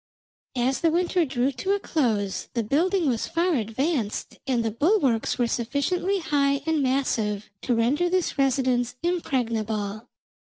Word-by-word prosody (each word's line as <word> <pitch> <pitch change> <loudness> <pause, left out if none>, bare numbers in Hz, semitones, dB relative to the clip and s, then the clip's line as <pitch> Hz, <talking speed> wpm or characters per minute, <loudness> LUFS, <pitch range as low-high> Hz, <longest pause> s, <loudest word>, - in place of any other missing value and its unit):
"As 255 +2 +1
the 330 - +4
winter 350 +1 +1
drew 260 -1 0
to 390 +8 -1
a - - -2
close 210 - -1
the 235 - +1
building 335 - +1
was 235 -4 0
far 340 +2 +1
advanced, 235 0 -2
and 240 -3 +1
the 225 - 0
bulwarks 275 - +2
were 245 - +2
sufficiently 285 - 0
high 280 -5 +1
and 320 -2 +1
massive 230 -6 0
to 245 - 0
render 275 +10 +2
this 365 -2 0
residence 255 -3 +1
impregnable. 225 - -1
265 Hz, 145 wpm, -25 LUFS, 230-330 Hz, -, the